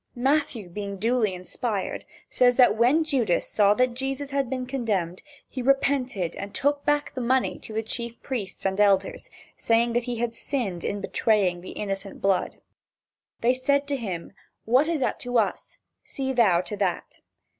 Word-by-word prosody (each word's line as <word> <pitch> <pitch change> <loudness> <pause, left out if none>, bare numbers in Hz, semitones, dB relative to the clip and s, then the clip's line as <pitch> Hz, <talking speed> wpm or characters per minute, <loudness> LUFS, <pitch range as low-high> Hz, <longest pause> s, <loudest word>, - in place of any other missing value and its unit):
Matthew 255 -5 0
being 200 +2 -5
duly 220 -1 +1
"inspired" 195 +3 -4 0.2
says 245 -1 +3
that 245 -4 +5
when 250 +8 +4
Judas 255 - +1
saw 205 -1 +3
that 255 0 +2
Jesus 270 +2 -4
had 275 -3 0
been 255 -1 -3
condemned, 210 -10 -2 0.3
he 260 - -5
repented 255 -8 +1
and 200 0 -7
took 285 +1 +1
back 295 0 0
the 260 - -4
money 255 +2 +1
to - - -11
the 220 +1 -2
chief 235 +1 -5
priests 210 -10 -5
and 190 +1 0
elders, 210 - +2 0.3
saying 235 +1 +2
that 240 0 0
he 245 -1 -3
had 235 0 -2
sinned 230 - -3
in 200 0 -2
betraying 195 -5 +1
the 185 - -9
innocent 195 -1 -4
blood. 195 -2 0 0.8
They 240 +2 +4
said 280 +2 +1
to 285 - +1
him: 190 -10 -5 0.3
"What 255 +7 +4
is 330 -4 -1
that - - 0
to 245 0 -1
us? 210 -4 -1 0.3
See 265 -2 -3
thou 205 -9 +4
to 210 - -6
that." 190 -4 -2
235 Hz, 170 wpm, -25 LUFS, 200-265 Hz, 0.8 s, that